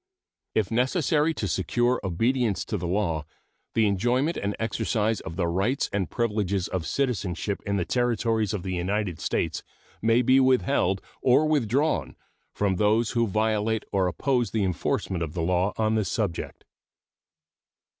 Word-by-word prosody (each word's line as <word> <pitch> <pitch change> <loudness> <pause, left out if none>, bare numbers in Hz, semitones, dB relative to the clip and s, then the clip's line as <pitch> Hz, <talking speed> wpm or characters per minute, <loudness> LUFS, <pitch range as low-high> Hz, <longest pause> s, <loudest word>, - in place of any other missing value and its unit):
If 110 -1 +1
necessary 150 +6 +2
to 105 - -2
secure 120 +7 +1
obedience 115 +4 0
to - - -3
the 90 -3 -3
law, 85 -5 0 0.5
the 110 - +4
enjoyment 120 - +1
and 100 0 -2
exercise 110 -1 0
of 80 - -7
the 90 -1 0
rights 95 +11 0
and 95 -3 -1
privileges 105 -5 -1
of 90 -3 -3
citizenship 105 -7 -1
in 100 0 +1
the 90 - -1
Territories 115 -3 +1
of 100 -5 -3
the 95 - -3
United 90 0 -1
States - - -1 0.4
may 115 +3 +3
be 130 +2 +5
withheld 130 -7 +2 0.2
or 130 +4 +4
withdrawn 140 - +1 0.4
from 100 -3 0
those 105 +3 +2
who 115 -1 +1
violate 110 +1 0
or 95 -2 +2
oppose 120 - 0
the 110 +1 0
enforcement 90 0 -1
of 80 0 -4
the 85 - -1
law 90 +3 +1
on 110 0 +1
this 110 -5 0
subject. 105 -8 -3
105 Hz, 150 wpm, -26 LUFS, 95-120 Hz, 0.5 s, be